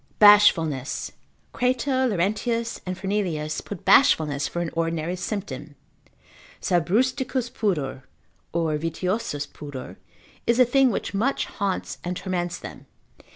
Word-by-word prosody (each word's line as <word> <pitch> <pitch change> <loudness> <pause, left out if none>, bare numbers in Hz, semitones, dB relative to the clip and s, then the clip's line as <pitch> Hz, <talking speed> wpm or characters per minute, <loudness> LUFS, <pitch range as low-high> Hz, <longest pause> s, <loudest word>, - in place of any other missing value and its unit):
Bashfulness.] 165 -10 +5 0.4
Crato, 255 +1 +1
Laurentius, 225 +4 -1
and 185 0 -3
Fernelius, 185 -6 -2
put 200 -5 -8
bashfulness 150 - +4
for 175 - -4
an 170 -2 -2
ordinary 165 +1 -1
symptom, 150 - -5 0.8
sabrusticus 245 - +1
pudor, 155 - -1 0.5
or 165 -2 0
vitiosus 165 -1 -2
pudor, 145 -3 -9 0.5
is 235 +1 +3
a 255 - +8
thing 265 +2 +4
which 205 - -3
much 235 +8 0
haunts 200 -3 -3
and 180 0 -3
torments 180 -2 -2
them. - - -10
185 Hz, 110 wpm, -24 LUFS, 160-230 Hz, 0.8 s, a